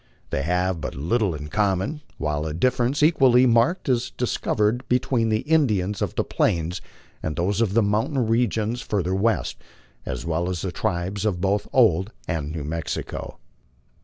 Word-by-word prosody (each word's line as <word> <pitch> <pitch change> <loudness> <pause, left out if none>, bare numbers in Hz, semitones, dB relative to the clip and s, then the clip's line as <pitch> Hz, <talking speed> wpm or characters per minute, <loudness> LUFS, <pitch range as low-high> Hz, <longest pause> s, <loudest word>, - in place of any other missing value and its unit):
They - - 0
have 90 +2 0
but - - -4
little 90 - 0
in 75 0 -7
common, 105 - 0 0.2
while 75 0 -2
a 75 - -4
difference 125 - +1
equally 130 -6 +5
marked 120 +9 +2
is 125 -2 +1
discov 125 - -1
ered 105 +3 +2
between 125 -2 +1
the 110 0 +1
Indians 105 - +1
of - - -2
the - - +1
Plains 85 +1 0 0.4
and 80 -1 -3
those 95 +5 0
of 105 -3 +1
the 115 - +5
mountain 110 +6 +1
regions 115 0 0
fur 105 -5 -1
ther 90 +2 -1
west, 95 - 0 0.4
as 65 0 -5
well 85 +2 -1
as 90 -3 -3
the 95 - -2
tribes 95 +1 -2
of 100 -5 0
both 100 +2 0
Old 105 -5 +3 0.2
and 80 -4 -2
New 80 -2 -4
Msxico. 80 +1 -4
100 Hz, 170 wpm, -24 LUFS, 85-120 Hz, 0.4 s, equally